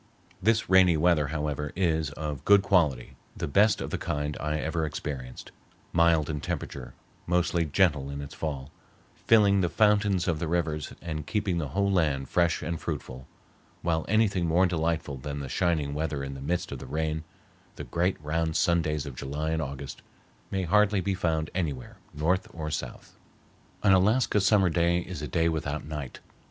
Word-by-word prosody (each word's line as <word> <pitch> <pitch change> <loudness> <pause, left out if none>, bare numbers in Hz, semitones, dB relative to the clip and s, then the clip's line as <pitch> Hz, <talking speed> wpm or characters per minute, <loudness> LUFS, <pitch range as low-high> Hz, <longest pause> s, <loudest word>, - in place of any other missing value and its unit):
This 110 +2 +2
rainy 95 -3 +5
weather, 75 -2 +3
however, 75 -1 -3
is 80 -5 +1
of 75 -2 -5
good 100 +2 +6
quality, 80 -11 +1 0.2
the - - -2
best 100 +7 +3
of - - -4
the - - -2
kind 75 0 -2
I 75 0 -1
ever 80 +1 -2
experienced, 70 -4 -5 0.4
mild 80 -2 +4
in 75 -2 -3
temperature, - - -5 0.3
mostly 85 -1 +1
gentle 75 -3 +2
in 70 0 -5
its 70 -1 -7
fall, 70 -3 -5 0.6
filling 100 -3 +5
the 90 - +1
fountains 105 -3 +2
of 80 -3 0
the 85 - -2
rivers 80 -3 -1
and 75 -3 -5
keeping 100 -5 0
the 75 - -2
whole 100 +7 0
land 75 -8 +1
fresh 85 -3 +1
and 85 +1 -3
fruitful, 65 0 -5 0.6
while 80 -2 +1
anything 105 -5 +2
more 85 +3 +4
delightful 80 -4 -1
than 70 +2 -5
the 70 - -5
shining 80 -2 0
weather 75 -2 -2
in 70 0 -5
the 70 - -8
midst 85 +6 -2
of - - -5
the - - -9
rain, 80 0 -2 0.5
the - - -6
great 90 +3 0
round 80 +1 -1
sun 85 0 +3
days 75 -1 -2
of 70 - -6
July 75 +5 -3
and 80 0 0
August, 70 -1 -6 0.5
may 95 -1 -1
hardly 105 +3 +3
be 95 +2 -1
found 80 -4 -1
anywhere, 75 -9 -3
north 85 +5 0
or 75 -2 -4
south. 65 -5 -6 0.6
An 100 -2 +6
Alaska 105 +3 +3
summer 95 -1 +4
day 85 +1 +2
is 90 -3 -7
a 75 - -3
day 80 +1 +1
without 75 -2 -2
night. 75 -4 -6
80 Hz, 175 wpm, -27 LUFS, 75-90 Hz, 0.6 s, good